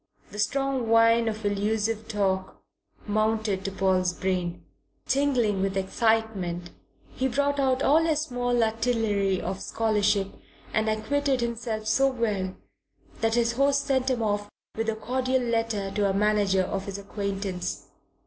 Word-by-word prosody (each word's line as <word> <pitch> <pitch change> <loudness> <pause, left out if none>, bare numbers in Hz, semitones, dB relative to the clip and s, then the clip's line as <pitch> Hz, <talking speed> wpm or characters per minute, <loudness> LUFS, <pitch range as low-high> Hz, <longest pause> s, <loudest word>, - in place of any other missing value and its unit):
The 210 - -8
strong 270 +1 0
wine 230 0 +5
of 220 -1 -3
allusive 215 +2 0
talk 190 -3 -1 0.4
mounted 215 -2 0
to 195 - -1
Paul's 185 -2 +1
brain. 180 -2 -2 0.4
Tingling 250 -8 +1
with 195 0 -1
excitement, 195 -4 0 0.4
he 260 - 0
brought 285 +2 0
out 265 0 +2
all 310 +4 +5
his 315 -2 +1
small 245 -4 0
artillery 220 -4 +1
of 190 0 -4
scholarship 210 -3 +1 0.4
and 215 0 +1
acquitted 265 +5 0
himself 230 -2 -3
so 245 +5 +3
well 205 -7 -2 0.6
that 225 0 +1
his 235 -1 +2
host 275 +3 +2
sent 265 -1 +1
him 245 -3 0
off 205 -1 -1 0.3
with 225 0 -1
a 220 - -1
cordial 255 +3 0
letter 225 -4 -1
to 205 -1 +1
a - - 0
manager 205 -2 +2
of 195 +1 -3
his 200 0 -4
acquaintance. 200 -2 -4
220 Hz, 140 wpm, -26 LUFS, 195-245 Hz, 0.6 s, wine